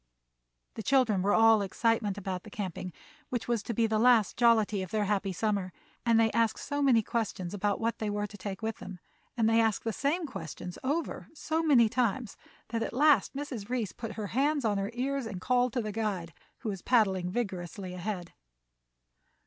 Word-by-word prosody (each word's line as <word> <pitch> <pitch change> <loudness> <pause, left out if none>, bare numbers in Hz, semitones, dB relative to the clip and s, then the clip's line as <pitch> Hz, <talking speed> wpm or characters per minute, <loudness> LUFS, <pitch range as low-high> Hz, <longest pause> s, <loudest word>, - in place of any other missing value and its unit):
The - - -6
children 230 -6 +3
were 200 +2 +2
all 225 -1 +6
excitement 210 0 0
about 185 -2 -4
the 215 - -12
camping, 185 -3 -5 0.4
which 245 -2 -3
was 235 -3 +1
to 235 - -5
be 230 - +3
the 220 -1 +1
last 235 -3 +4
jollity 220 -4 +3
of 185 - -5
their 215 +1 0
happy 200 -1 0
summer, 200 -1 -1 0.4
and 230 -1 +5
they 225 -1 +3
asked 230 -1 +2
so 290 0 -3
many 250 -5 +4
questions 205 -6 -3
about 205 0 0
what 230 +1 -1
they 215 - -1
were 205 0 -1
to 210 - -10
take 195 +1 -6
with 220 0 -2
them, 190 -1 -8 0.4
and 225 -2 +3
they 225 0 +4
asked 220 -2 +1
the 225 - -2
same 305 - 0
questions 180 - -7
over 300 +5 -2
so 320 +1 -1
many 270 -8 +5
times, 235 -1 -1 0.3
that 230 0 -2
at - - -3
last 290 +1 +4
Mrs. 255 -7 -5
Reece 240 -6 -1
put 230 -2 -6
her 215 - -4
hands 285 +1 +1
on 205 -2 +1
her 195 +1 -2
ears 270 0 -1
and 195 -4 -6
called 250 +4 +2
to 245 - -1
the 215 - -3
guide, 200 -6 -3 0.3
who 220 - -3
was 195 -3 -4
paddling 190 -7 +2
vigorously 185 -3 -4
ahead. 180 -1 -5
220 Hz, 195 wpm, -30 LUFS, 200-240 Hz, 0.4 s, all